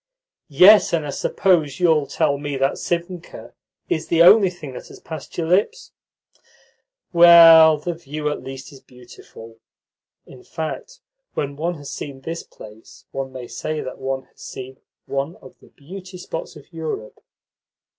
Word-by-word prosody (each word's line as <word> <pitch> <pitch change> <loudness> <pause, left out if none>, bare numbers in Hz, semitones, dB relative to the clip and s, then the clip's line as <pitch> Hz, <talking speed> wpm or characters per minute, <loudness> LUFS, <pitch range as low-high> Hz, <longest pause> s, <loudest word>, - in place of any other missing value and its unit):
"Yes, 185 +10 +6
and 160 -3 0
I 145 - -4
suppose 160 -3 0
you'll 160 -5 +2
tell 145 -2 0
me 145 -1 -4
that 135 +1 0
sivnkha 175 0 -5 0.3
is 160 0 -2
the 170 0 +4
only 195 +2 +7
thing 155 -7 -10
that - - -10
has - - -14
passed 160 -4 -10
your 170 - -1
lips? 200 - 0 1.2
Well, 165 -2 +8
the 175 +4 -4
view 155 -2 -6
at - - -5
least 135 0 -9
is 135 - -14
beautiful. 115 -2 -15 0.7
In 130 -2 -15
fact, 165 - -7 0.3
when 140 0 -3
one 170 +4 -3
has 145 -2 -9
seen 135 -2 -8
this 165 +4 -5
place 110 +1 -15
one 135 -1 -5
may 130 -2 -8
say 155 +5 -5
that 130 - -8
one 135 0 -3
has - - -24
seen 130 0 -9 0.3
one 140 +4 -3
of - - -17
the - - -19
beauty 185 +5 -11
spots 170 -2 -7
of 150 +3 -16
Europe." 160 -10 -6
155 Hz, 155 wpm, -21 LUFS, 135-170 Hz, 1.2 s, Well